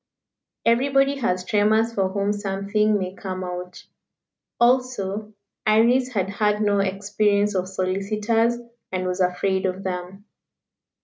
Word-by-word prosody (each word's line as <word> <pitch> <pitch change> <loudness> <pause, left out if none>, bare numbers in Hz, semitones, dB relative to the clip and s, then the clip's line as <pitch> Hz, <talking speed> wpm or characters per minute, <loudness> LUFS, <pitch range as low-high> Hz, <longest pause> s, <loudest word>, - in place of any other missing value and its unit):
Everybody 275 +4 +3
has 185 -8 -1
tremors 220 +3 +2
for 195 -3 0
whom 200 +1 0
something 205 +1 0
may 185 -1 -4
come 185 -1 -5
out. 180 0 -7 0.7
Also, 220 -4 +1 0.3
Iris 235 +4 +4
had 190 -4 0
had 210 +1 0
no 205 -1 +2
experience 200 +1 +1
of 185 -1 -1
solicitors, 210 +5 0 0.3
and 185 -1 -2
was 180 +1 -1
afraid 190 +1 +1
of 185 +1 -4
them. 185 +2 -5
200 Hz, 120 wpm, -23 LUFS, 190-220 Hz, 0.7 s, Iris